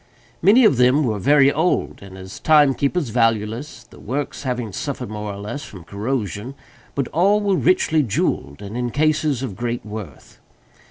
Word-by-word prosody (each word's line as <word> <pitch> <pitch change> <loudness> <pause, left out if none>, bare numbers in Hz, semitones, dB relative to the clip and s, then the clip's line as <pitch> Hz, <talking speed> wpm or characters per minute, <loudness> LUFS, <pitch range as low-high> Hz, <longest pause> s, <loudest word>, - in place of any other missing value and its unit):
Many 220 +8 +6
of 140 - +4
them 125 +4 +4
were 110 -6 -1
very 140 +4 +4
old, 165 +4 0
and 95 -1 -11
as 95 +1 -10
timekeepers 145 0 +3
valueless; 115 +3 -1
the - - -17
works 140 +5 -4
having 125 -6 -3
suffered, 135 - -4
more 105 -1 -5
or 100 - -7
less, 110 +9 -6
from 95 -4 -11
corrosion—but 115 - -5
all 195 +6 +3
were 200 -2 +1
richly 160 -3 +2
jewelled 100 - -2
and 100 +2 -7
in 120 0 -1
cases 150 -1 +1
of 115 -8 -5
great 120 0 -3
worth. 105 - -9
125 Hz, 160 wpm, -21 LUFS, 105-150 Hz, -, Many